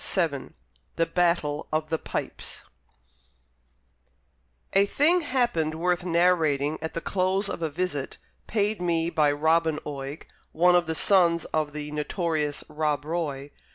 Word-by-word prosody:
Amiel 145 -7 0 0.5
THE 165 - +2
BATTLE 165 -4 0
OF 155 0 -1
THE 160 - +1
PIPES - - -4 2.1
A 200 +1 +4
thing 330 - +3
happened 240 - 0
worth 175 +2 0
narrating 165 -4 +2
at 160 - -5
the 165 - -2
close 190 +2 0
of - - -5
a 160 - 0
visit 150 -3 -3 0.3
paid 210 -2 0
me 170 -1 0
by 155 -3 +3
Robin 160 +1 +2
Oig, 140 0 -6 0.3
one 180 +3 +5
of 175 -2 +3
the 160 - -1
sons 170 -3 +4
of 155 -2 0
the 150 0 -5
notorious 150 -1 -1
Rob 150 -2 -1
Roy. 145 -4 -3
165 Hz, 135 wpm, -26 LUFS, 150-180 Hz, 2.1 s, one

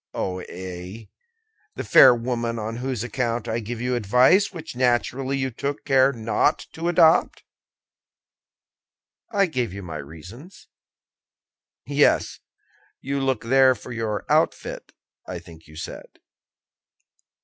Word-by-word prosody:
"Oh, 95 -1 -3
ay! 95 +4 -8 0.7
the - - -4
fair 130 -2 +7
woman 115 -1 -3
on 110 +1 -4
whose 125 -2 -3
account 120 -1 -2
I 115 0 -1
gave 115 +1 -6
you 125 +1 -1
advice, 125 - +3
which 160 -6 -9
naturally 130 +2 0
you 130 -1 -2
took 140 +5 -4
care 135 -1 +4
not 115 +4 0
to 165 +1 -4
adopt." 165 -2 +3 1.9
"I 200 -3 +3
gave 125 - -2
you 100 0 -7
my 80 -3 -6
reasons." 90 - -12 1.2
"Yes; 145 +2 +2 0.6
you 140 +1 -3
look 135 -3 -1
there 130 +2 +4
for 125 - -11
your 110 -3 -3
outfit, - - 0 0.4
I 90 - -5
think 85 -2 -14
you 80 - -15
said." 80 - -9
120 Hz, 125 wpm, -23 LUFS, 105-135 Hz, 1.9 s, fair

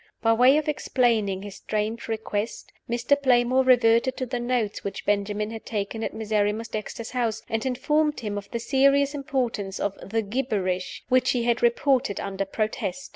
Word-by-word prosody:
By 225 0 +5
way 250 +5 +6
of 310 - -1
explaining 230 -9 +1
his 205 -1 -8
strange 215 +2 -3
request, 220 -1 -3 0.2
Mr. 240 +4 +2
Playmore 255 0 +4
reverted 245 0 +4
to 255 - -2
the 245 0 -3
notes 240 -3 -1
which 195 -1 -5
Benjamin 205 +1 0
had 225 -1 -7
taken 215 +1 -3
at - - -2
Miserrimus 215 0 -1
Dexter's 220 +1 -5
house, 235 -3 -1
and 225 0 -2
informed 295 +4 +1
him 210 -2 -3
of 200 -1 -6
the 235 - -3
serious 275 +3 +3
importance 250 -9 -2
of 205 - -1
"the 225 +2 -1
gibberish" 200 -5 -2
which 255 0 +3
he 245 -2 0
had 235 0 +1
reported 245 -1 +2
under 195 0 -3
protest. 215 +3 -3
230 Hz, 170 wpm, -25 LUFS, 210-255 Hz, 0.2 s, way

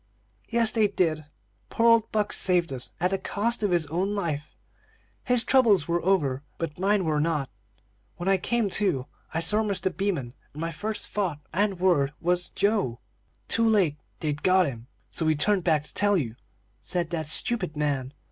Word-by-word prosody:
"Yes, 230 -2 +3
they 220 -2 +3
did. 165 -6 0 0.4
Poor 230 - +2
old 230 -1 +4
Buck 210 -1 0
saved 175 -5 +2
us, 125 -2 -3
at 180 +3 +1
the 195 - 0
cost 230 +3 -1
of 205 - +1
his 175 -3 +2
own 180 +7 -1
life. 155 -7 -2 0.8
His 250 -1 +2
troubles 225 - +4
were 170 0 0
over, 150 -9 +1 0.2
but 165 -1 -5
mine 195 0 +2
were 155 -2 +1
not; 150 -4 -1
for - - -40 0.6
when 175 - -3
I 195 0 +4
came 235 +4 0
to, 150 -11 +1 0.3
I 165 - -1
saw 210 +6 +2
Mr. 195 -4 -1
Beaman, 170 -10 -2 0.2
and - - -8
my 165 +1 -2
first 210 +7 -2
thought 185 -8 -2
and 195 0 +1
word 155 -7 +2
was 180 +1 0
'Joe?'" 200 - 0 0.5
"'Too 230 0 +2
late 180 -9 +2 0.2
they'd 150 -1 -2
got 185 0 +4
him, 120 -5 -6 0.2
so - - -2
we 155 0 +2
turned 190 +5 +2
back 155 -4 +2
to 150 - -8
tell 205 -1 +2
you,' 120 -9 -3 0.5
said 175 -2 -2
that 160 -3 -2
stupid 180 -1 0
man. 140 -3 -1
180 Hz, 185 wpm, -26 LUFS, 150-205 Hz, 0.8 s, old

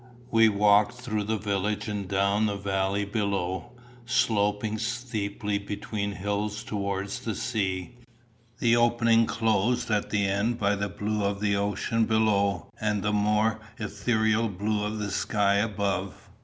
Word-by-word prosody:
We 115 -1 +6
walked 105 +1 +4
through 110 -4 -3
the 110 +1 0
village 105 +1 -1
and 105 -2 -3
down 100 +3 +2
the 100 - -1
valley 100 0 -1
beyond, 100 -3 -1 0.4
sloping 110 -3 +1
steeply 110 -4 -2
between 100 0 -4
hills 105 +2 -2
towards 100 -1 -3
the 110 -3 -4
sea, 95 -1 -2 0.6
the 120 -1 +3
opening 115 -1 +4
closed 115 +2 +1
at 105 -1 0
the 105 -1 +1
end 100 +5 0
by 100 -3 +2
the 100 0 -2
blue 105 +3 -2
of 100 0 -1
the 100 -1 +1
ocean 105 +3 0
below 105 -3 +1
and 105 -2 0
the 105 0 0
more 105 +1 +2 0.2
ethereal 110 +1 0
blue 105 +2 -1
of 105 +1 -2
the 105 -1 -3
sky 100 0 +1
above. 100 -3 -2
105 Hz, 140 wpm, -27 LUFS, 100-110 Hz, 0.6 s, We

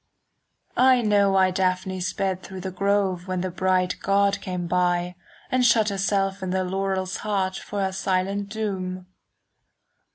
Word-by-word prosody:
I 255 -1 +5
know 205 -2 +4
why 190 -1 +4
Daphne 185 0 -1
sped 185 +1 -2
through 190 0 -8
the 190 +1 -4
grove 195 -1 +1
5 175 - -17
When 185 -1 -2
the 185 0 -3
bright 185 0 +1
god 200 0 +2
came 180 -1 -4
by, 175 0 +1 0.4
And 255 -1 +2
shut 225 -3 +4
herself 195 0 0
in 185 - -3
the 185 +1 0
laurel's 190 0 -2
heart 195 -3 -1
For 205 -1 -4
her 190 - 0
silent 195 +1 -1
doom. 190 -4 -4
190 Hz, 155 wpm, -24 LUFS, 185-200 Hz, 0.4 s, I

